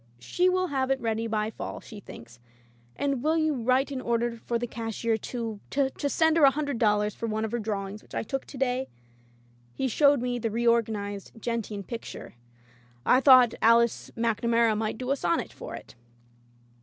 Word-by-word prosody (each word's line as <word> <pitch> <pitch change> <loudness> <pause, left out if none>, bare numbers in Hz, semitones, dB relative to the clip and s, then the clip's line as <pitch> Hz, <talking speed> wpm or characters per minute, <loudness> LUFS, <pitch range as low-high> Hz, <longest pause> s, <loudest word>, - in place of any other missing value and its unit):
She 355 - +1
will 370 0 0
have 265 -2 -1
it 270 0 +1
ready 225 -1 -1
by 215 0 -1
fall, - - -6
she 215 - -11
thinks 115 - -13 0.3
— 120 0 -28
^and 275 -3 0
will 315 +4 +2
you 315 -1 +2
write 255 +2 +1
an 265 -2 -3
order 235 0 0
for 235 - +1
the 240 - -2
cashier 225 -1 -2
to 225 -1 -5
— - - -32
^to 280 +1 -1
send 320 +2 +3
her 320 - +4
a 275 - +9
hundred 285 -3 -3
dollars 210 -1 +2
for 230 - -4
one 220 0 -1
of 220 - -5
her 240 - -1
drawings 205 -1 -4
which - - -13
I - - -1
took 270 +4 -4
to 275 - -11
day?" 260 0 0 0.9
He 265 - -1
showed 280 +3 +4
me 245 0 -2
the 225 - -1
reorganized 220 -3 0
gentian 220 -3 -3
picture. 230 +2 -8 0.4
" 120 0 -31
I 255 - +4
thought 255 -4 +7
Alice 230 +1 +3
MacNamara 230 0 +2
might 215 0 -2
do 255 +2 -3
a - - +3
sonnet 175 -10 -1
for - - -8
it.'' - - -11
235 Hz, 195 wpm, -27 LUFS, 215-265 Hz, 0.9 s, a